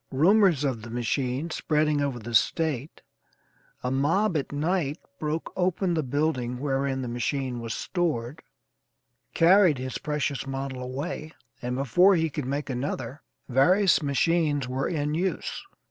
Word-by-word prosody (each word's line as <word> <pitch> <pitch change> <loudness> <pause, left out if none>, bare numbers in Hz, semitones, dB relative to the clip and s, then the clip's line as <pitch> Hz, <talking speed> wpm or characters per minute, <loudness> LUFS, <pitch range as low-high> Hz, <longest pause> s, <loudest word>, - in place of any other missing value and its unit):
Rumors 175 +1 +4
of 130 -6 -1
the 115 - -9
machine 125 +6 -2
spreading 150 -2 +1
over 140 -3 -1
the 120 0 -7
State, 145 +4 +1 0.8
a 125 - -1
mob 165 +9 +2
at 145 - -1
night 155 0 0 0.2
broke 155 +1 -3
open 185 0 +1
the 160 - +1
building 130 -3 -1
wherein 135 -1 -1
the - - -4
machine 125 +1 -2
was 115 -1 -4
stored, 155 -5 -2 0.9
carried 175 -2 +5
his 130 0 -4
precious 145 -2 -2
model 135 -1 -4
away, 140 +5 -5 0.3
and 125 +1 -2
before 175 - +4
he 160 -2 0
could 145 -2 -4
make 140 +2 -2
another, 130 0 -4 0.3
various 175 +11 +4
machines 145 -1 +1
were 130 +2 -1
in 150 -2 -1
use. 180 +4 -2
145 Hz, 140 wpm, -26 LUFS, 130-160 Hz, 0.9 s, carried